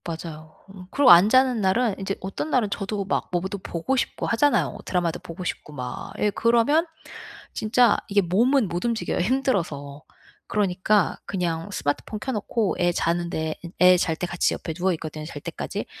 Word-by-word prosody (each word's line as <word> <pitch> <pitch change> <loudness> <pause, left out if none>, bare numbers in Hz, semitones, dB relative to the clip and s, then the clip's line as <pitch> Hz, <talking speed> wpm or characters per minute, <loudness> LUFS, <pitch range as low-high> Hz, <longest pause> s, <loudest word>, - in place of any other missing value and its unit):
맞아요. 160 -2 -7
음, 190 -2 -11
그리고 280 -4 +5
안 175 +4 +8
자는 255 -2 +4
날은 205 +3 +2
인제 195 0 -2
어떤 195 +11 -4
날은 235 -5 +2
저도 200 0 -3
막 190 - -2
뭐 175 - +1
보 185 - -4
또 200 - -4
보고 175 +8 -2
싶고 255 - -2
하잖아요. 230 -2 +2
드라마도 175 -2 -1
보고 180 0 -8
싶고 150 -3 -5
막. 125 -3 -6
예 210 - +1
그러면 235 - +3 0.7
진짜 225 +1 +3
이게 200 0 +3
몸은 230 +7 +2
못 175 +4 -3
움직여요 230 -1 -1
힘들어서. 175 - -1 0.4
그러니까 200 -1 +1
그냥 175 -2 -2
스마트폰 190 +6 -3
켜 265 - -3
놓고 215 -2 -1
애 175 -1 +3
자는데 170 -2 -1
인 170 - -8
애 180 0 +7
잘 165 -2 0
때 180 - -3
같이 175 0 0
옆에 160 - -5
누워 180 +3 0
있거든요, 155 -1 -6
잘 150 -2 -8
때까지. - - -5
190 Hz, 355 characters per minute, -24 LUFS, 170-225 Hz, 0.7 s, 안